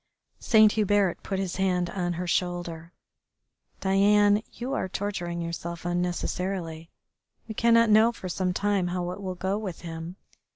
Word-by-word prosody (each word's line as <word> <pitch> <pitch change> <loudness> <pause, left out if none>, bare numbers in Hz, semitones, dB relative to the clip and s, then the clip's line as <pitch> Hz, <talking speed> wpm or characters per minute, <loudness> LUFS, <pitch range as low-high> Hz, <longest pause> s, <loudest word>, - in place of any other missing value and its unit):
Saint 215 -2 +5
Hubert 205 -4 +1
put 195 - -3
his 190 -2 -3
hand 180 -2 +1
on 175 -2 -2
her 175 +2 -4
shoulder. 175 -2 -2 0.9
"Diane, 205 +2 +4
you 250 +3 -5
are 190 - -2
torturing 175 -4 -3
yourself 170 0 -5
unnecessarily. 175 -1 -2 0.6
We 220 - -5
cannot 230 0 +4
know 220 +2 +6
for 190 - -8
some 180 +1 -1
time 200 -1 0
how 175 0 -2
it 200 - -7
will 185 -2 -4
go 190 +3 -1
with 190 -6 -6
him. 165 +1 -7
185 Hz, 150 wpm, -27 LUFS, 175-205 Hz, 0.9 s, know